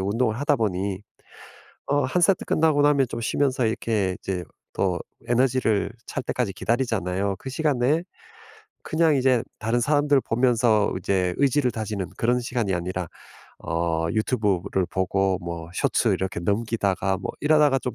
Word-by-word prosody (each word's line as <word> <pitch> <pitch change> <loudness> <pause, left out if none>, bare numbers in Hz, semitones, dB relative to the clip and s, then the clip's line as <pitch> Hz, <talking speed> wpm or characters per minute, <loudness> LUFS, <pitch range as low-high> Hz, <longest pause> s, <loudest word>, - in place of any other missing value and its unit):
운동을 110 +4 0
하다 145 0 +2
보니 100 -3 -2 0.9
어 145 0 +2
1 130 +8 0
세트 185 +2 +3
끝나고 155 -2 +2
나면 140 -3 +4
좀 - - -5
쉬면서 130 +1 +1
이렇게 110 -4 -1
이제 90 -2 -3 0.3
더 - - 0 0.3
에너지를 120 -4 +2 0.2
찰 - - -4
때까지 125 -5 -1
기다리잖아요. 100 -4 -1
그 135 - -7
시간에 145 +2 +1 0.8
그냥 160 -2 +2
이제 130 -3 +3 0.2
다른 115 +3 0
사람들 145 +2 +3
보면서 115 -3 +2
이제 90 -1 0
의지를 140 -1 +2
다지는 105 -4 -4
그런 120 +2 +2
시간이 120 -5 -1
아니라 90 0 -3 0.5
어 80 -1 -1
유튜브를 105 -5 0
보고 95 0 0
뭐 85 -1 -6
쇼츠 - - +1
이렇게 95 -2 -1
넘기다가 100 -1 0
뭐 95 - -4
이러다가 150 -2 +4
좀 125 - -4
115 Hz, 315 characters per minute, -24 LUFS, 95-130 Hz, 0.9 s, 나면